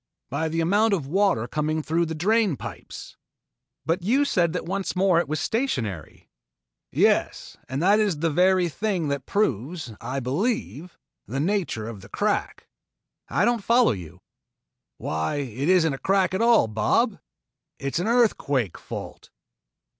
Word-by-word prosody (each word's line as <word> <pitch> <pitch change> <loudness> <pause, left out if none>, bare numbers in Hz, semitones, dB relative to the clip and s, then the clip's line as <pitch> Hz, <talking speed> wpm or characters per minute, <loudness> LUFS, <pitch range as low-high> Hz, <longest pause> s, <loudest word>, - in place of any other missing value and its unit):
"By 160 +4 -1
the 165 +1 -1
amount 205 +5 +3
of 160 -8 -4
water 160 - +1
coming 155 +3 -1
through 165 +3 0
the 160 - -4
drain 200 - +2
pipes." - - -9 0.7
"But 165 +4 0
you 255 +10 +2
said 175 - +2
that 180 - -3
once 195 +2 -3
more 185 -2 +3
it 170 - -1
was 155 +1 -2
stationary." 125 - -3 0.6
"Yes, - - +1
and 135 +5 -2
that 205 +3 +5
is 205 -7 +1
the 165 +2 0
very 180 +2 +3
thing 180 -2 -2
that 140 -2 -3
proves, 155 - -1
I 135 +2 -3
believe, 175 - -2 0.3
the 135 +4 -3
nature 170 - -1
of 110 -4 -8
the - - -14
crack." - - -2 0.6
"I - - +2
don't 235 -3 +1
follow 235 - +4
you." 90 -8 -8 0.8
"Why 80 - -2
it 140 +1 -3
isn't 170 -5 +4
a 135 - -6
crack 190 -1 +1
at 190 - 0
all, 230 - +5
Bob. 150 - +1 0.6
It 140 0 -4
is - - 0
an 180 - -1
earthquake 145 - +1
fault." - - -8
170 Hz, 155 wpm, -24 LUFS, 140-200 Hz, 0.8 s, that